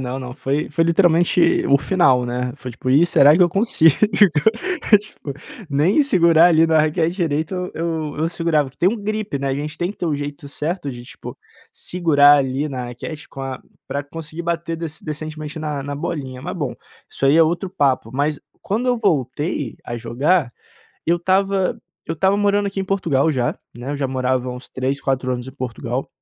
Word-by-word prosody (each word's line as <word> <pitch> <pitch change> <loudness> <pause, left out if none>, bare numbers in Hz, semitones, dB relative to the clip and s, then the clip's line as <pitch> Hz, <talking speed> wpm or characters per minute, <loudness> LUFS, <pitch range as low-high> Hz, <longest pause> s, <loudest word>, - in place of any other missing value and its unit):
Não, 130 +1 -4
não 125 -1 -7
foi 140 +2 -2
foi 165 +2 +1
literalmente 170 0 +3
o 140 - +5
final, 135 -5 +3
né? 125 +1 -2
Foi 130 -2 -7
tipo: 125 +2 -4
"Ih 150 +6 +5
será 145 -2 +6
que 180 - +5
eu 175 - +5
consigo?" 170 - +3 1.1
Tipo, 205 -8 -9 0.4
nem 155 - +3
segurar 170 - +5
ali 165 -1 +4
na 160 -1 +3
raquete 160 +3 0
direito 160 -1 -1
eu 180 0 -3
eu 160 -2 -3
eu 160 - +1
segurava, 165 -4 0
porque 135 - -22
tem 180 - +4
um 215 - -8
grip, 215 -3 -3
né, 140 0 -2
a 135 - 0
gente 150 +2 -5
tem 175 +1 -1
que 205 - -11
ter - - -4
o 155 - 0
jeito 145 0 -6
certo 150 +1 -3
de 120 -2 -8
tipo, - - -10 0.4
segurar 145 -5 +4
ali 135 +2 -1
na 125 -3 -5
raquete 150 +6 -8
com 135 - -9
a 135 -1 -5 0.3
pra 140 - -2
conseguir 160 +2 -8
bater 170 -1 -2
decen 160 -1 -7
decentemente 155 0 -6
na 150 -3 -3
na 145 +1 -5
bolinha 135 -3 -5
mas 180 +4 -5
bom, 145 -6 -3 0.4
isso - - -4
aí 140 +3 +5
é 165 - +7
outro 175 +4 -1
papo, 135 - 0
mas 145 +2 0 0.2
quando 225 +6 -2
eu 245 - +2
voltei 145 - -1
a 120 - -5
jogar, 130 +8 +1 0.6
eu 170 - +3
estava 190 +2 +1 0.3
eu 165 - -2
estava 190 +5 +2
morando 205 0 +2
aqui 200 0 -4
em - - -2
Portugal 165 -7 +1
já, 125 -4 0 0.2
né, 120 +3 -6
eu 145 - -2
já 140 -1 -1
morava 130 -1 -1
uns 125 +1 -8
3 130 +2 -2
4 130 -2 -1
anos 125 0 -4
em 130 - -9
Portugal 125 +1 -4
150 Hz, 200 wpm, -20 LUFS, 135-170 Hz, 1.1 s, é